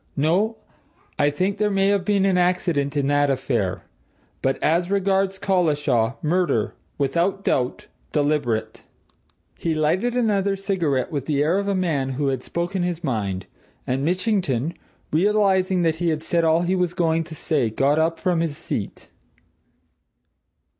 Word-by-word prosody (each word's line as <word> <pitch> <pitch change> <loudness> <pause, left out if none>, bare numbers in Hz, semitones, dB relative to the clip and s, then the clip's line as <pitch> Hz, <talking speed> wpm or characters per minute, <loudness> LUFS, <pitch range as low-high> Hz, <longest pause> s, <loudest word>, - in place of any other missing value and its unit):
No 180 +10 +2 0.6
I 145 0 +4
think 185 +7 -1
there 210 -1 +2
may 195 -1 +2
have 200 -2 +2
been 200 0 +2
accident 175 -5 +1
in 140 - +1
that 145 0 +2
affair. 120 -8 -1 0.6
But, 135 0 +1
as 170 +3 +2
regards 195 -1 +1
Collishaw 150 - +1
murder, 160 - +1 0.2
without 170 +8 0
doubt 125 -8 0 0.3
deliberate!" 145 -7 -1 0.7
He 165 -2 -1
lighted 180 +11 +1
another 200 -5 +1
cigarette, 175 -9 -1
with 140 -3 -3
the 145 -2 +1
air 170 +6 +2
of 200 - -3
a 200 - +1
man 145 -8 0
who 140 +1 0
had 130 -2 -2
spoken 175 +6 -3
his 175 -1 -2
mind, 100 - -2 0.4
and 130 +2 -1
Mitchington, 175 - 0 0.4
realizing 190 0 +2
that 160 -1 +1
he 170 0 0
had 155 -1 -2
said 170 -1 +1
all 165 +1 +3
he 180 +2 0
had 165 -2 0
to 160 - -8
say, 145 -8 0
got 140 +7 +2
up 165 +1 +1
from 180 -2 +1
his 165 -3 -2
seat. - - -5
165 Hz, 145 wpm, -23 LUFS, 145-190 Hz, 0.7 s, I